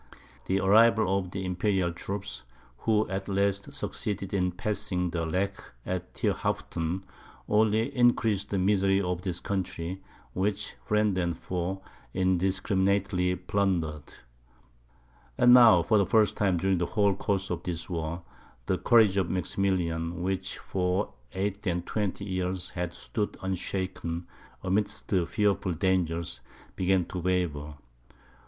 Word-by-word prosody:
The 95 +1 +2
arrival 105 0 +5
of 90 -2 -6
the 95 +1 -4
Imperial 90 -1 0
troops, 100 +3 -5 0.4
who 110 -1 +2
at 95 +1 -4
last 100 +4 0
succeeded 105 -7 -4
in 90 -2 +1
passing 90 -1 -1
the 85 -1 -2
Lech 100 +4 -1 0.2
at 90 -1 -4
Thierhaupten, 85 +4 -1 0.4
only 110 +5 +2
increased 115 -5 +2
the 100 - -1
misery 95 0 +3
of 90 -2 -1
this 90 -2 -3
country, 95 -1 -3 0.3
which 100 +2 -1
friend 105 -2 +2
and 85 -2 -1
foe 95 +1 -3 0.3
indiscriminately 95 0 +1
plundered. 90 -6 -1 1.3
And 125 0 +7
now, 115 -9 +8
for 105 +5 +3
the 100 - +2
first 110 0 +3
time 95 -4 +2
during 95 +1 +1
the 85 - 0
whole 100 +2 +2
course 100 0 -2
of 90 - -2
this 85 -2 -4
war, 85 -1 -3 0.4
the 95 - 0
courage 110 -5 +5
of 95 -3 +1
Maximilian, 90 -2 -1
which 95 0 -2
for 90 +1 -1 0.2
eight 100 +2 -2
and 85 -1 -1
twenty 100 -2 -2
years 95 -1 -2
had 85 -1 -4
stood 105 -2 -3
unshaken 95 -2 -3 0.4
amidst 100 +3 -1
fearful 95 +1 +1
dangers, 85 -1 0 0.3
began 95 -1 +2
to 90 - -5
waver. 85 -5 -1
95 Hz, 130 wpm, -28 LUFS, 90-100 Hz, 1.3 s, now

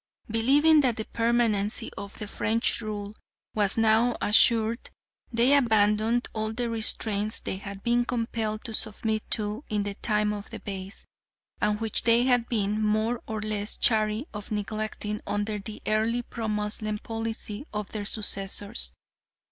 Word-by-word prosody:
Believing 290 +7 +5
that 250 -5 +1
the 220 - -4
permanency 230 -2 +1
of 200 0 -7
French 220 +2 -1
rule 210 -2 -5 0.4
was 205 -1 +1
now 225 +2 +3
assured, 225 +2 +3 0.4
they 245 +4 +4
abandoned 220 -1 +3
all 215 0 -2
the 235 +1 -2
restraints 215 -1 +1
they 190 - -4
had 200 0 -8
been 240 0 +2
compelled 225 -2 -2
to 225 - -4
submit 220 0 -1
to 215 +3 -1
in 210 -1 0
the 205 0 -3
time 210 0 0
of 205 0 -7
the - - -7
Beys, 195 -1 -7 0.6
and 210 -1 +1
which 225 -2 +1
they 235 +1 +4
had 245 -2 +2
been 210 -2 0
more 215 +3 +1
or 220 -1 -3
less 210 -1 -1
chary 215 +2 +2
of 210 -1 -7
neglecting 215 0 -3
under 205 +1 -1
the 210 +2 -8
early 225 +3 +1
pro 225 -1 -5
Moslem 210 0 -1
policy 225 +3 -4
of 210 -2 -5
their 210 -2 -4
successors. 200 - +1
215 Hz, 150 wpm, -27 LUFS, 210-230 Hz, 0.6 s, Believing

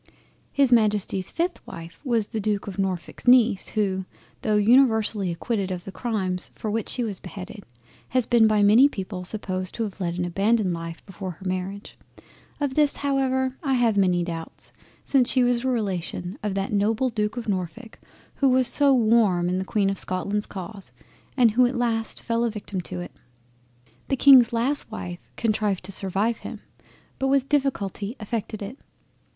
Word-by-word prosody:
His 275 -3 +3
Majesty's 210 -4 +2
5th 345 +2 -1
Wife 165 0 -10
was 235 -6 +1
the 220 +1 -4
Duke 205 -1 -1
of 200 -2 -7
Norfolk's 185 -3 -3
Neice 240 -5 +5
who, 190 -3 0 0.4
tho' 215 - +1
universally 220 -3 +4
acquitted 195 +3 -2
of 180 -1 -4
the 195 - -8
crimes 190 -5 -2
for 215 - -4
which 225 0 -2
she 245 - -1
was 205 -5 -2
beheaded, 195 +3 -9 0.4
has 255 -2 +2
been 230 -2 +5
by 215 -1 +3
many 230 +8 +7
people 190 -5 -6
supposed 185 -1 -3
to 230 - -1
have 200 -2 -6
led 170 -1 -1
an 180 - -1
abandoned 195 +2 +1
life 165 0 -7
before 195 -1 -7
her 180 +2 -10
Marriage—of 200 +8 -6
this 295 0 +2
however 265 -2 0
I 270 -5 +1
have 235 -3 +2
many 180 -3 +3
doubts, 165 -1 -6 0.3
since 260 -3 +3
she 255 - +3
was 245 0 +1
a - - -1
relation 190 -5 -2
of 205 -2 -2
that 195 0 -2
noble 220 +5 +1
Duke 210 0 -2
of 235 - -5
Norfolk 205 +4 -4 0.4
who 275 - +3
was 255 -1 +3
so 285 -1 +4
warm 215 -7 +3
in 180 +1 0
the - - -1
Queen 195 -1 +1
of 195 - -3
Scotland's 200 +3 -1
cause, 195 +1 -8 0.5
and 240 -4 +5
who 245 +3 +4
at 255 - -3
last 230 -2 -1
fell 230 0 0
a 235 - +1
victim 205 -3 -5
to 90 - -6
it. 90 - -8 1.0
The 270 - 0
Kings 260 -3 +7
last 245 +5 0
wife 175 -5 -6 0.2
contrived 210 -4 0
to 190 - -6
survive 195 +4 0
him, - - -8 0.6
but 270 - +1
with 275 0 +2
difficulty 240 -7 -1
effected 215 -1 -4
it. 235 +8 -8
210 Hz, 175 wpm, -24 LUFS, 190-240 Hz, 1.0 s, many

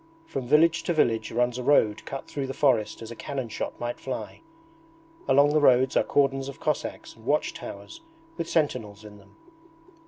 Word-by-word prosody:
From 135 - -5
village 165 +4 +4
to 175 - +1
village 115 -7 +1
runs 125 +1 0
a - - -4
road 110 -6 +3
cut 135 - -6
through 140 -2 -4
the 135 - -5
forest 120 -6 +1
as 115 - -8
a - - -7
cannon 130 -1 -5
shot 110 - -5
might 120 0 -4
fly. 130 - -6 0.9
Along 140 +1 +5
the 155 - +3
roads 130 -1 +4
are - - +5
cordons 135 -1 +1
of 140 - -10
Cossacks 150 - -3
and - - -18
watch - - 0
towers 330 0 -9 0.3
with 170 -1 -4
sentinels 110 -9 -1
in 105 -1 -12
them. 100 - -21
130 Hz, 185 wpm, -26 LUFS, 115-145 Hz, 0.9 s, Along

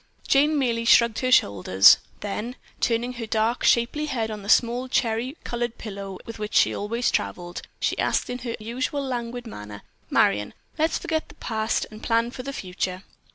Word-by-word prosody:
Jane 295 +3 +4
merely 235 -4 0
shrugged 230 -1 +5
her 255 0 0
shoulders, 95 - +6 0.2
then 210 +4 -4 0.2
turning 240 +1 0
her 235 -2 -6
dark, 220 +2 0
shapely 250 +6 +2
head 225 -6 -2
on 210 -1 -6
the 200 - -8
small 245 +3 +3
cherry 245 +3 0
colored 240 -1 -3
pillow 200 -3 -7
with 230 -1 -8
which 210 0 -4
she - - +5
always 230 +4 -1
traveled, 175 0 -3 0.2
she - - -1
asked - - +1
in 245 0 -4
her 235 -2 -4
usual 255 +6 -3
languid 245 -2 -4
manner, 105 - -9 0.3
"Marion, 105 +1 +2 0.2
let's 320 +1 +2
forget 320 -2 -2
the 295 - -14
past 220 -4 -1
and 215 0 -11
plan 230 +1 +1
for 255 - -7
the 275 +2 -5
future." 185 -4 -4
230 Hz, 175 wpm, -25 LUFS, 210-250 Hz, 0.3 s, shoulders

